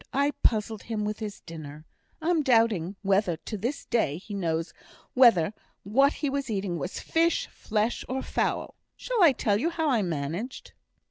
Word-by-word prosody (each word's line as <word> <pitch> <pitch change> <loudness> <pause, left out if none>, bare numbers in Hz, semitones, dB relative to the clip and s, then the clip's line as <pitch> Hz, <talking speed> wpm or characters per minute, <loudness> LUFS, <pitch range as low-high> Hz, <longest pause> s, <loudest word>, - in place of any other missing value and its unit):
I 280 +2 +2
puzzled 215 -1 +1
him 215 -2 -3
with 210 0 -3
his 210 -2 -6
dinner. 155 -2 -9 0.4
I'm 330 -1 +2
doubting 225 - +2
whether 195 -3 +2
to 215 - -7
this 240 +8 -3
day 155 -11 +1
he 200 +4 -9
knows 165 -3 -2 0.4
whether 225 -8 +5 0.3
what 275 +8 +4
he 295 - -2
was 275 -2 -2
eating 195 -5 -2
was 180 - -4
fish, 335 +1 +1
flesh, 220 +2 -1
or 265 +1 -2
fowl. - - -1 0.2
Shall - - -1
I 335 -5 +8
tell 210 -5 +1
you 325 - +1
how 320 -3 0
I 235 -4 +3
managed?" 170 - -4
215 Hz, 165 wpm, -27 LUFS, 180-265 Hz, 0.4 s, I